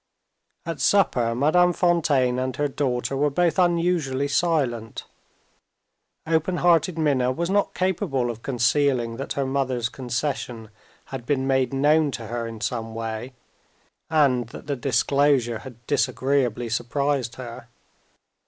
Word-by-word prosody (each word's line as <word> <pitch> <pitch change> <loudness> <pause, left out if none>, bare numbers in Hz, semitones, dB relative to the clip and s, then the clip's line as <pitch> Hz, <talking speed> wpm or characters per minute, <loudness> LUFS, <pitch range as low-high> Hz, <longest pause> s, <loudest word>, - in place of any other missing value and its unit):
At 165 -3 -4
supper 120 - +2
Madame 175 +7 +3
Fontaine 150 -9 +2
and 130 0 -2
her 145 - 0
daughter 135 -2 -2
were 145 +2 +2
both 175 +5 +1
unusually 170 -6 +1
silent. 140 -9 0 1.2
Open 160 +2 0
hearted 170 -1 +3
Minna 135 -5 +2
was 170 +7 -2
not 205 0 +1
capable 165 - 0
of 115 -1 -10
concealing 125 -2 +1
that 135 - -4
her 140 - -1
mother's 130 -3 -1
concession 120 -3 -4 0.4
had 130 -3 -4
been 135 -3 0
made 130 -2 +1
known 150 +3 +3
to 115 - -9
her 115 0 -4
in 115 -1 -8
some 115 -2 -3
way, 115 +2 -5 0.8
and 135 -7 +2
that - - -10
the 140 0 -2
disclosure 130 -1 +1
had 120 -3 -12
disagreeably 130 -2 0
surprised 125 +1 -1
her. 120 -2 -9
135 Hz, 130 wpm, -24 LUFS, 120-150 Hz, 1.2 s, Madame